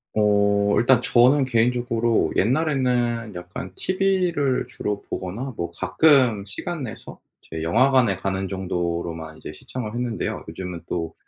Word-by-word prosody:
어 100 -1 +3
일단 125 +1 +4
저는 130 +4 +4
개인적으로 120 -1 +1
옛날에는 125 -4 +1
약간 90 +1 -7
TV를 185 -9 0
주로 105 -4 -4
보거나 115 +9 -4
뭐 85 0 -3
가끔 125 0 +3
시간 150 - -5
내서 115 0 -8 0.2
이제 80 0 -7
영화관에 120 +4 +3
가는 95 0 -2
정도로만 85 -4 -3
이제 75 - -8
시청을 110 +5 -7
했는데요. 120 -2 -3
요즘은 85 0 -6
또 80 -2 -3
115 Hz, 300 characters per minute, -23 LUFS, 95-130 Hz, 0.2 s, 일단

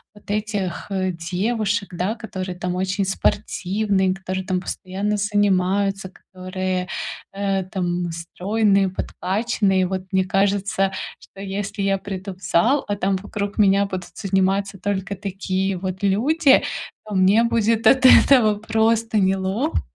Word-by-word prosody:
вот 205 0 -9
этих, 205 -4 -2
э, 185 -1 -1
девушек, 200 +5 -1
да, 185 +6 -1
которые 190 -5 -6
там 180 0 -3
очень 190 +1 -1
спортивные, 195 0 0
которые 190 0 -4
там 185 -1 -1
постоянно 195 +3 -3
занимаются, 195 -1 +1
которые, 185 0 -4 0.4
э, 195 -1 -1
там 175 -2 -2
стройные, 195 +4 +1
подкачанные. 190 0 0
Вот 190 0 -2
мне 190 -1 +2
кажется, 195 0 +1 0.3
что 195 - -17
если 200 +1 -4
я 195 0 +1
приду 195 -1 -6
в 185 - -21
зал, 250 +14 +2
а 205 - -1
там 195 -1 0
вокруг 200 +1 -5
меня 200 0 +4
будут 185 -2 -5
заниматься 195 0 0
только 200 -1 -2
такие 195 -1 -2
вот 185 +1 -5
люди, 270 +10 +4 0.4
то 210 - -7
мне 195 +5 +4
будет 230 -1 +1
от 260 -1 +5
этого 235 -6 +6
просто 225 0 +1
неловко 195 +9 0
195 Hz, 130 wpm, -22 LUFS, 185-205 Hz, 0.4 s, этого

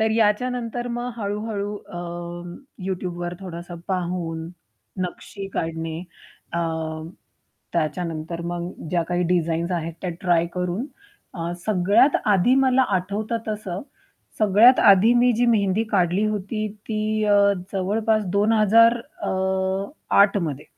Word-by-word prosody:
तर 220 0 +3
याच्यानंतर 230 +2 0
मग 240 +1 -3
हळू-हळू 205 -1 -3
अं, 175 -1 -7 0.3
YouTubeवर 175 -2 -3
थोडंस 175 -2 -7 0.2
पाहून 175 -3 -2 0.5
नक्षी 195 +2 -6
काढणे 160 0 -3 0.5
अ, 170 - -1 1.1
त्याच्यानंतर 165 0 -2
मग 175 0 -4 0.2
ज्या 175 -2 +2
काही 175 +1 -1
डिझाईन्स 170 -1 0
आहेत, 165 -1 -2
त्या 180 - -2
ट्राय 170 -2 +2
करून 180 +7 -2 0.5
अ, 170 -1 -3
सगळ्यात 205 +7 +4
आधी 210 +4 +4
मला 260 0 +4
आठवतं, 205 +5 -2
तसं 205 -4 -4 0.6
सगळ्यात 215 +5 +6
आधी 200 +5 +6
मी 245 +1 +4
जी 245 - +3
मेहंदी 210 -3 +2
काढली 185 0 +2
होती 215 +1 -2 0.2
ती 215 0 0
अ, 205 -1 +4 0.4
जवळपास 215 +3 +1
2008मध्ये. 200 - +2
195 Hz, 105 wpm, -23 LUFS, 175-215 Hz, 1.1 s, सगळ्यात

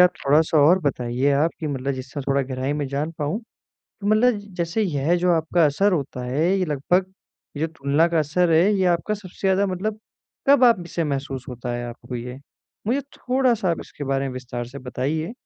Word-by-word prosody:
आप 180 0 +7 0.2
थोड़ा-सा 155 +2 +4
और 165 +6 +6
बताइए 130 -1 0
आप 150 +4 +2
कि 160 - -2
मतलब 140 -1 -2
जिससे 130 +2 -6
थोड़ा 140 +1 +1
गहराई 130 +1 -3
में 145 -1 -2
जान 145 +4 -2
पाऊँ, 150 +10 -1 0.6
तो 200 - -4
मतलब 215 +2 +4 0.2
जैसे 170 +5 0
यह 160 -3 +1
जो 180 0 +2
आपका 165 0 +2
असर 190 +8 +2
होता 135 -5 -2
है 140 +7 0
ये 185 - +1
लगभग, 180 +6 0 0.4
ये 155 - 0
तुलना 155 0 +1
का 170 -1 +1
असर 165 +4 +2
है 160 +1 +6
ये 190 -1 +1
आपका 175 +4 +1
सबसे 195 -4 -12
ज़्यादा 195 +1 +3
मतलब 205 +4 -3 0.5
कब 280 -2 +7
आप 230 -7 +5
इसे 170 -1 -2
महसूस 135 -2 -3
होता 120 0 -5
है 120 0 -3
आपको 120 +1 -7
ये? 125 +2 -6 0.5
मुझे 255 +5 +1 0.2
थोड़ा-सा 250 -7 +1
आप 165 - -1
इसके 145 - -8
बारे 135 0 0
में - - -5
विस्तार 120 -1 -5
से 140 +2 -9
बताइए। 140 - -3
155 Hz, 200 wpm, -23 LUFS, 135-180 Hz, 0.6 s, आप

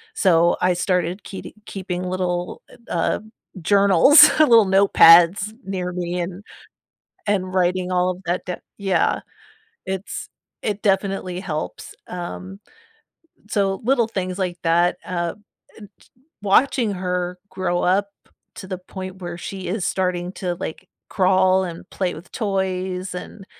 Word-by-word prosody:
so 170 - +3
I 180 0 +3
started 180 +1 -1
keeti 195 - -9
keeping 185 -2 -5
little, 180 -1 -3
eh, - - -15 0.2
uh, 165 -2 0 0.4
journals, 200 - +7
little 230 -8 +7
notepads 190 +1 +6
near 185 -2 -3
me 175 0 -3
and 180 +3 -6 0.8
and 185 -2 0
writing 185 0 +1
all 180 0 +2
of 185 +1 -7
that 175 +1 -1
d 180 - -3 0.2
Yeah. 195 -2 +1 0.7
Its 190 +1 -5 0.3
It 210 -1 -2
definitely 195 -2 0
helps, 155 -5 -5
um, 185 +2 -7 0.9
so, 195 -2 0
little 245 -3 +2
things 185 -3 -4
like 180 -2 -2
that, 170 +1 +2
uh, 175 -2 -2 0.4
and 205 -2 -11
ch - - -23 0.3
watching 225 +2 +3
her 180 -1 -3
grow 175 -2 -1
up 195 +3 +2 0.5
to 190 - -8
the 185 -1 -4
point 185 0 -9
where 175 -1 -5
she 190 +1 -6
is 190 -1 -2
starting 180 -1 -1
to, 180 -2 -3
like, 160 - -7 0.2
crawl 185 -1 +3
and 175 +1 -8
play 185 -2 -2
with 160 +4 -13
toys 190 -3 -2
and 195 +2 -8
185 Hz, 135 wpm, -22 LUFS, 180-195 Hz, 0.9 s, journals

